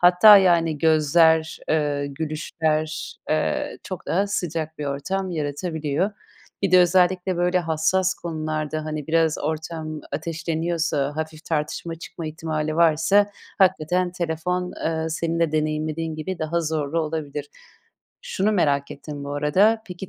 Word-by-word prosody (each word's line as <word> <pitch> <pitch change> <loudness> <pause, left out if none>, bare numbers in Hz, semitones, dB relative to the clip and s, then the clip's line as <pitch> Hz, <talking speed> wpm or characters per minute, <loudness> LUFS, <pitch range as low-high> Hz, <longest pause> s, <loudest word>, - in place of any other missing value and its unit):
hatta, 180 +4 +8
yani, 170 -5 +3
gözler, 160 +1 +3
eee, 145 -2 0
gülüşler, 155 +1 -2
eee, 155 0 -1
çok 185 -3 -7
daha 195 +4 +1
sıcak 160 -5 -3
bir 150 - -3
ortam 185 +8 -2
yaratabiliyor. 155 +2 -2 0.5
Bir 195 - +1
de 185 - +7
özellikle 180 +1 +3
böyle 180 +1 +2
hassas 175 +3 +1
konularda, 155 -2 -3
hani, 155 -2 -4
biraz 160 -1 +2
ortam 155 0 -4
ateşleniyorsa, 160 -2 -1
hafif 155 0 -5
tartışma 160 +1 -2
çıkma 165 0 -8
ihtimali 155 0 -3
varsa 170 +5 +4 0.3
hakikaten 180 -1 +2
telefon, 180 +1 -2
eee, 160 0 -1
senin 165 +1 -1
de 160 -2 +2
deneyimlediğin 155 +1 -1
gibi 170 +4 -5
daha 165 +2 -1
zorlu 155 0 -1
olabilir. 150 -2 -4 0.8
Şunu 210 +3 0
merak 140 -7 +1
ettim 145 0 -7
bu 145 0 -4
arada: 195 +10 +3
Peki 180 +1 -8
160 Hz, 130 wpm, -23 LUFS, 155-175 Hz, 0.8 s, hatta